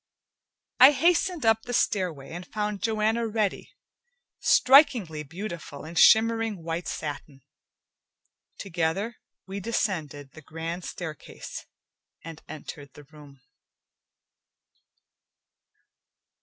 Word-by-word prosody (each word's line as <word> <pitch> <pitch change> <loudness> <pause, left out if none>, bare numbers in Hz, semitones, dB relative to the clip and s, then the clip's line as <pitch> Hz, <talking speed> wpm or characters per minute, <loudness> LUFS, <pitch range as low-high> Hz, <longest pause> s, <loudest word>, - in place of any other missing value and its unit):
I 260 +3 +9
hastened 345 0 +1
up 225 0 +4
the 245 - -5
stairway, 175 -13 -1
and 175 +2 -6
found 210 -1 -3
Joanna 225 +1 0
ready, 215 -2 -2 0.7
strikingly 250 - +4
beautiful 165 -2 -8
in 160 - -9
shimmering 220 0 +4
white 165 +1 -4
satin. 145 -2 -6 1.1
Together, 190 +5 -2 0.3
we 195 +1 -6
descended 160 -10 -3
the 160 - -13
grand 165 +3 -6
staircase 160 -5 -8 0.6
and 165 -1 -9
entered 145 -2 -9
the 150 - -13
room. 145 -2 -16
180 Hz, 90 wpm, -26 LUFS, 155-225 Hz, 1.1 s, I